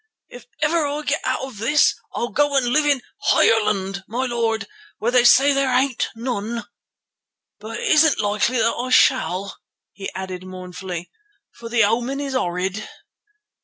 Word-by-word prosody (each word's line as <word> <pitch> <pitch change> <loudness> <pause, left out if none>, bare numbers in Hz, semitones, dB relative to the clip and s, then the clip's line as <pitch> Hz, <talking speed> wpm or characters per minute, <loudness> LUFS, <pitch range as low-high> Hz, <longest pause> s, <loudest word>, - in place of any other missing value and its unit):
If 245 -1 -13 0.2
ever 310 0 +2
I 295 +1 -4
get 290 +1 -1
out 255 - -1
of 260 -6 -8
this 260 +7 +3 0.2
I'll 240 - -2
go 290 -1 +1
and 260 - +2
live 295 +5 +2
in 280 -4 +1 0.3
Ireland, 195 -3 +2
my 245 +4 -2
lord, 230 -3 -1 0.3
where 230 +3 -1
they 250 -1 +4
say 275 +3 +6
there 275 -1 +1
ain't 255 0 +1
none. 235 -1 -4 0.9
But 220 +2 -7
it - - -3
isn't 310 -1 +4
likely 210 +4 0
that 230 - +2
I 250 +2 -4
shall," 200 -7 +2 0.3
he 195 - -6
added 185 -1 -6
mournfully, 180 -1 -7 0.4
"for 230 -1 -10
the 230 -1 +3
omen 240 +6 0
is 280 -2 -4
horrid." 185 -2 -2
235 Hz, 160 wpm, -21 LUFS, 205-265 Hz, 0.9 s, say